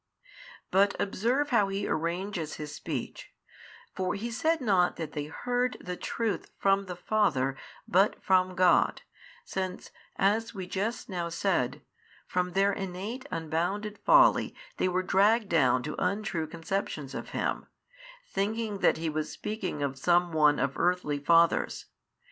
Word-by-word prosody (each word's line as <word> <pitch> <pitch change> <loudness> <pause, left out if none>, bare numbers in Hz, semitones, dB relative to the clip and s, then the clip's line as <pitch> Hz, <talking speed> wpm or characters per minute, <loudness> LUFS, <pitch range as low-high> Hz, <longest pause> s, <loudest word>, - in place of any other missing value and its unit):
But 200 +1 +4
observe 245 +9 0
how 210 -5 +4
He 195 +1 -2
arranges 170 0 -2
His 150 -1 -7
speech: 145 -7 -6 0.6
for 185 -1 -1
He 230 +4 -4
said 320 +8 +1
not 190 -7 +2
that 160 -3 -5
they 145 -1 -4
heard 245 +10 -1
the 180 0 -5
truth 225 +3 -3
from 195 0 +2
the 180 - -5
Father 170 -9 +1 0.3
but 195 +3 +3
from 185 -1 +3
God, 180 0 +3 0.4
since, 185 - -4 0.2
as 215 +4 +1
we 190 -2 -4
just 205 +6 -3
now 175 -4 -3
said, 170 -7 -1 0.4
from 180 0 -1
their 195 +1 +3
innate 195 +8 -5
unbounded 175 +6 -2
folly - - +5 0.2
they - - +1
were 185 0 0
dragged 205 +3 +3
down 130 -6 +3
to 150 - -4
untrue 180 -4 -1
conceptions 165 -4 -4
of - - -6
Him, - - -2 0.6
thinking 210 - -2
that - - +3
He 165 +1 -3
was 155 0 -2
speaking 195 -9 -4
of 135 -1 -3
some 175 +3 +3
one 150 -2 +4
of 135 0 -1
earthly 175 -5 +1
fathers. 165 +3 +3
185 Hz, 145 wpm, -29 LUFS, 160-205 Hz, 0.6 s, folly